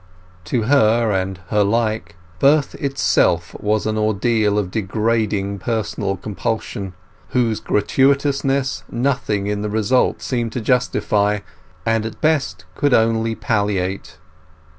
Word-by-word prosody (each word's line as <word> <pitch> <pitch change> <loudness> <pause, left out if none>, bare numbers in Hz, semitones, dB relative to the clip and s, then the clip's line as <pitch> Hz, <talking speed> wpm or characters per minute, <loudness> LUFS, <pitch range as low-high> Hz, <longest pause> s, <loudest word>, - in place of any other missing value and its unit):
To 110 +5 0
her 115 -3 +3
and 95 -1 -2
her 105 -1 +3
like, 110 -5 -1 0.2
birth 145 +1 +3
itself 140 -1 +1
was 105 0 0
an 110 0 -1
ordeal 110 0 +1
of 95 -3 -1
degrading 105 -1 -1
personal 100 -2 -2
compulsion, 100 -1 -4 0.4
whose 115 -3 0
gratuitousness 140 +3 +1
nothing 120 -5 -1
in 105 0 -2
the 105 - -2
result 110 +4 +1
seemed 120 -3 -2
to - - -2
justify, 105 -4 +1 0.4
and 115 -1 +1
at 110 - -10
best 130 - 0
could 145 - +2
only 115 0 +1
palliate. 100 -6 -2
110 Hz, 120 wpm, -20 LUFS, 100-120 Hz, 0.4 s, her